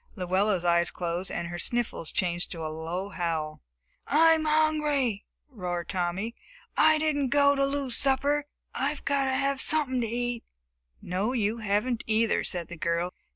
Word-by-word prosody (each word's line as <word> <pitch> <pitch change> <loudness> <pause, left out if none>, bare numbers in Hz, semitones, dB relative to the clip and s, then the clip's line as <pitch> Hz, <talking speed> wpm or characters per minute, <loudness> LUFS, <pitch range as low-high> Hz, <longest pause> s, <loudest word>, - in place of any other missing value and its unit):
Luella's 185 0 0
eyes 170 0 +3
closed 175 +1 -3
and 170 - -4
her 175 0 -5
sniffles 240 -9 -1
changed 175 -1 -1
to 165 -2 -5
a 155 - -4
low 170 +5 -4
howl. 165 -5 -3 0.5
"I'm 320 +1 +5
hungry!" 300 -7 +1 0.2
roared 180 - -5
Tommy. 190 +4 -2 0.4
"I 315 0 +5
didn't 295 -3 0
go 285 +1 +5
to 275 -1 +1
lose 275 -3 -1
the - - +1
supper. 280 +2 +2 0.3
I 295 - -1
gotta 275 -1 +1
have 275 0 +1
sumpin' 275 -5 +2
to 230 - -1
eat!" 240 +1 -2 0.6
"No, 195 +7 -1
you 225 -1 0
haven't 220 +3 0
either," 220 0 +2
said 175 -3 -3
the 175 - -9
girl. 170 +2 -1
225 Hz, 155 wpm, -27 LUFS, 175-275 Hz, 0.6 s, I'm